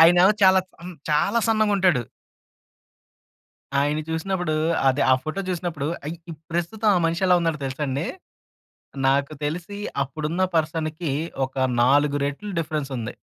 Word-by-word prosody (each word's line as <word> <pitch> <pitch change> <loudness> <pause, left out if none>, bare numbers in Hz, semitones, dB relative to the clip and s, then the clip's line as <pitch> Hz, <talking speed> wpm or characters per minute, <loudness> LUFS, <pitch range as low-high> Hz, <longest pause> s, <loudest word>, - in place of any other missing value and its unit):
ఆయనేమో 175 +4 +7
చాలాచ్ 190 -1 +5
అన్ 180 0 -8 0.2
చాలా 150 +9 +2
సన్నగుంటాడు. 200 - +3 1.8
ఆయన్ని 150 +2 0
చూసినప్పుడూ 175 0 -1 0.3
అదే 135 +2 +2
ఆ - - +7
ఫోటో 155 +5 -3
చూసినప్పుడు, 170 -5 -3 0.2
ఐ - - -3 0.2
ఇప్ 155 -2 -9
ప్రస్తుతం 190 +6 -1
ఆ - - +4
మనిషెలా 180 +2 +2
ఉన్నాడో 165 -3 0
తెలుసండి? 135 +3 -2 1.0
నాకు 140 +2 +2
తెలిసి 170 +7 -4 0.3
అప్పుడున్న 155 +5 -3
పర్సన్‌కి 155 0 -1 0.3
ఒక 130 - -14 0.3
4 145 +3 +4
రెట్లు 145 +9 -4
డిఫరెన్సుంది. 135 -7 -3
160 Hz, 115 wpm, -24 LUFS, 145-180 Hz, 1.8 s, ఆయనేమో